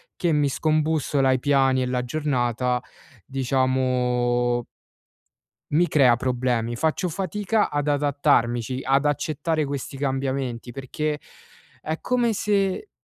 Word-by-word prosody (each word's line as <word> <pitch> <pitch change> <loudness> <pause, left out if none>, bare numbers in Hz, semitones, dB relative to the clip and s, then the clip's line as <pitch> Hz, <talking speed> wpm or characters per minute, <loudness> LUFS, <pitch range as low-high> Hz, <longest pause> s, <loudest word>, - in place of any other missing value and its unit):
che 175 -3 0
mi 145 -1 +2
scombussola 155 -2 +1
i 130 - +2
piani 135 -1 +3
e - - 0
la 125 0 -1
giornata, 125 -3 0 0.5
diciamo 125 -2 +1 1.1
mi 170 +4 +4
crea 130 -8 +4
problemi. 125 -2 -1
Faccio 160 +7 0
fatica 205 +5 -1
ad 145 0 -1
adattarmici, 140 -4 +1
ad 135 +2 +2
accettare 155 +2 0
questi 140 0 -5
cambiamenti, 135 -3 -2
perché 150 +3 -3 0.6
è 160 +1 -4
come 245 -2 +1
se 205 - 0
135 Hz, 110 wpm, -24 LUFS, 125-155 Hz, 1.1 s, mi